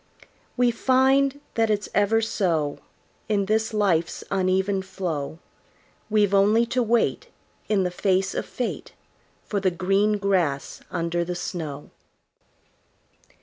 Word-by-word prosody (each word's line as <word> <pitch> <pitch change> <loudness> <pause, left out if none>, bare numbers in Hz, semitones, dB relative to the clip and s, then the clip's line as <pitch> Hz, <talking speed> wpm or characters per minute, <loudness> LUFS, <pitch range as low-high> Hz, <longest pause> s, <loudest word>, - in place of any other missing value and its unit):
We 245 -1 +4
find 265 +3 +2
that 225 -1 +1
it's 210 -1 0
ever 215 +2 +3
so 165 -9 0 0.5
In 200 -2 +1
this 220 +3 0
life's 190 -6 0
uneven 190 +1 +1
flow; 170 -6 -4 0.7
We've 210 -2 +2
only 210 +4 +4
to 255 - +2
wait, 235 0 +1 0.4
In 205 -3 +2
the 180 - -1
face 190 +1 +1
of - - -3
fate, 245 - -4 0.5
For 205 - -1
the 190 -1 +2
green 195 +4 +1
grass 180 -9 -1
under 170 +1 -1
the 175 +1 -4
snow. 155 -5 -5
195 Hz, 120 wpm, -24 LUFS, 180-220 Hz, 0.7 s, We